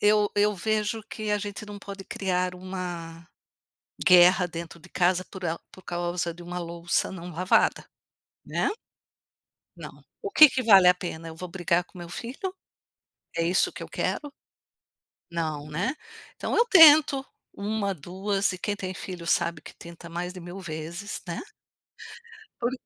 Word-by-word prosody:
eu 210 Hz, 0 st, +4 dB
eu 205 Hz, 0 st, +3 dB
vejo 215 Hz, +3 st, -1 dB
que 215 Hz, 0 st, -5 dB
a 210 Hz, -, +3 dB
gente 205 Hz, 0 st, -6 dB
não 205 Hz, 0 st, -8 dB
pode 200 Hz, -1 st, -9 dB
criar 185 Hz, -2 st, -1 dB
uma 175 Hz, -3 st, -6 dB, 0.8 s
guerra 180 Hz, 0 st, +7 dB
dentro 170 Hz, 0 st, -8 dB
de 180 Hz, -, -15 dB
casa, 180 Hz, +1 st, +1 dB
por 190 Hz, -2 st, -10 dB
a 165 Hz, 0 st, -1 dB
por 185 Hz, -, -15 dB
causa 175 Hz, 0 st, -2 dB
de 175 Hz, -, -12 dB
uma 175 Hz, +1 st, -5 dB
louça 170 Hz, +1 st, -1 dB
não 180 Hz, -1 st, -7 dB
lavada, 180 Hz, +3 st, +2 dB, 0.6 s
né. -, -, 0 dB, 1.1 s
Não. -, -, -11 dB, 0.2 s
O 405 Hz, -, -3 dB
que 310 Hz, -6 st, +9 dB
que 260 Hz, -1 st, -1 dB
vale 195 Hz, -5 st, +7 dB
a 180 Hz, -, +7 dB
pena? 165 Hz, -2 st, -6 dB
Eu 160 Hz, -, -9 dB
vou 180 Hz, +1 st, -7 dB
brigar 175 Hz, -1 st, +1 dB
com 180 Hz, -, -16 dB
meu 175 Hz, -, -8 dB
filho? 255 Hz, -, -5 dB, 0.8 s
É -, -, 0 dB
isso 175 Hz, +3 st, +2 dB
que -, -, -8 dB
eu -, -, -7 dB
quero? 290 Hz, -, -2 dB, 1.0 s
Não, 155 Hz, -3 st, -3 dB
né. 180 Hz, -, -1 dB, 0.4 s
Então -, -, -2 dB
eu 470 Hz, -, +5 dB
tento 300 Hz, -, +8 dB, 0.3 s
uma, 200 Hz, 0 st, -2 dB
duas 195 Hz, +5 st, -1 dB
e 185 Hz, -, -6 dB
quem 205 Hz, +2 st, -2 dB
tem 185 Hz, -2 st, -5 dB
filho 180 Hz, -2 st, -7 dB
sabe 170 Hz, -2 st, +1 dB
que -, -, -12 dB
tenta 170 Hz, 0 st, -11 dB
mais 175 Hz, +2 st, -4 dB
de 185 Hz, -, -9 dB
mil 175 Hz, +3 st, -8 dB
vezes, 170 Hz, +4 st, -6 dB
né. 170 Hz, -, -4 dB, 1.2 s
Por 240 Hz, -, +1 dB
180 Hz, 165 wpm, -26 LUFS, 170-205 Hz, 1.2 s, que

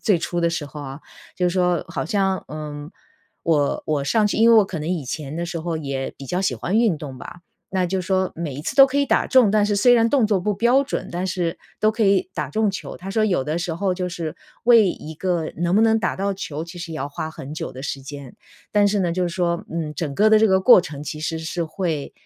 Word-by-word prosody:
最 200 Hz, -6 st, +3 dB
初 175 Hz, +1 st, -2 dB
的 170 Hz, -, +2 dB
时 160 Hz, -3 st, -3 dB
候 150 Hz, +1 st, -9 dB
啊， 135 Hz, +1 st, -8 dB, 0.4 s
就 180 Hz, -1 st, +2 dB
是 -, -, -3 dB
说 180 Hz, -3 st, +1 dB
好 170 Hz, -, -3 dB
像， 190 Hz, +1 st, 0 dB
嗯， 150 Hz, 0 st, -7 dB, 0.5 s
我 150 Hz, -4 st, +1 dB
我 150 Hz, -2 st, 0 dB
上 210 Hz, +9 st, +2 dB
去 -, -, -1 dB
因 230 Hz, +2 st, +5 dB
为 230 Hz, -, +7 dB
我 210 Hz, -, +6 dB
可 170 Hz, -5 st, -5 dB
能 155 Hz, -, -4 dB
以 170 Hz, -6 st, -2 dB
前 145 Hz, +3 st, -5 dB
的 170 Hz, 0 st, -3 dB
时 170 Hz, -2 st, -4 dB
候 165 Hz, -1 st, -3 dB
也 135 Hz, -3 st, -4 dB
比 135 Hz, -, -9 dB
较 180 Hz, +5 st, -1 dB
喜 190 Hz, -, 0 dB
欢 195 Hz, +5 st, -1 dB
运 220 Hz, -9 st, +3 dB
动 135 Hz, -4 st, -8 dB
吧， 175 Hz, -, -10 dB, 0.3 s
那 185 Hz, -1 st, 0 dB
就 190 Hz, +1 st, -1 dB
是 180 Hz, -, -8 dB
说 190 Hz, -1 st, +1 dB
每 155 Hz, -5 st, -4 dB
一 145 Hz, -, -6 dB
次 -, -, -4 dB
都 275 Hz, 0 st, +9 dB
可 275 Hz, +2 st, -1 dB
以 280 Hz, -, +2 dB
打 -, -, +2 dB
中， 255 Hz, -6 st, +5 dB
但 210 Hz, 0 st, +3 dB
是 205 Hz, -, 0 dB
虽 245 Hz, +4 st, +5 dB
然 230 Hz, -1 st, +4 dB
动 260 Hz, -6 st, +3 dB
作 205 Hz, -3 st, +2 dB
不 210 Hz, +3 st, 0 dB
标 240 Hz, +6 st, +3 dB
准， 280 Hz, -, -4 dB
但 180 Hz, +2 st, -3 dB
是 175 Hz, -2 st, -2 dB, 0.2 s
都 215 Hz, -, +4 dB
可 220 Hz, +1 st, -2 dB
以 195 Hz, -1 st, +2 dB
打 150 Hz, -4 st, -3 dB
中 215 Hz, +5 st, +1 dB
球。 190 Hz, -, -7 dB
他 190 Hz, +2 st, -8 dB
说 215 Hz, +1 st, +1 dB
有 180 Hz, -10 st, +1 dB
的 155 Hz, +2 st, -2 dB
时 175 Hz, -2 st, -3 dB
候 185 Hz, +1 st, 0 dB
就 180 Hz, 0 st, -3 dB
是， 170 Hz, -3 st, -5 dB, 0.3 s
为 230 Hz, -4 st, +7 dB
一 160 Hz, +1 st, -8 dB
个 175 Hz, -1 st, -1 dB
能 175 Hz, +2 st, 0 dB
不 215 Hz, -, +5 dB
能 225 Hz, 0 st, +4 dB
打 -, -, -1 dB
到 200 Hz, +1 st, -1 dB
球， 155 Hz, -4 st, -5 dB
其 170 Hz, +1 st, -10 dB
实 170 Hz, -1 st, -6 dB
也 -, -, -5 dB
要 140 Hz, +2 st, -3 dB
花 155 Hz, +2 st, -5 dB
很 145 Hz, -2 st, -9 dB
久 -, -, -5 dB
的 130 Hz, -, -9 dB
时 135 Hz, -2 st, -4 dB
间。 140 Hz, -2 st, -9 dB, 0.3 s
但 205 Hz, -1 st, +4 dB
是 205 Hz, 0 st, 0 dB
呢， 175 Hz, -2 st, +1 dB
就 185 Hz, +1 st, -1 dB
是 175 Hz, -, 0 dB
说， 175 Hz, +1 st, -1 dB
嗯， 160 Hz, -2 st, -3 dB
整 150 Hz, -5 st, -3 dB
个 210 Hz, +5 st, +4 dB
的 215 Hz, -, +7 dB
这 220 Hz, -, +5 dB
个 190 Hz, -1 st, +3 dB
过 190 Hz, -2 st, +8 dB
程 145 Hz, -5 st, -7 dB
其 150 Hz, +1 st, -6 dB
实 160 Hz, +1 st, -2 dB
是 165 Hz, +1 st, -3 dB
会， 160 Hz, -4 st, -3 dB
175 Hz, 290 characters per minute, -22 LUFS, 155-200 Hz, 0.5 s, 都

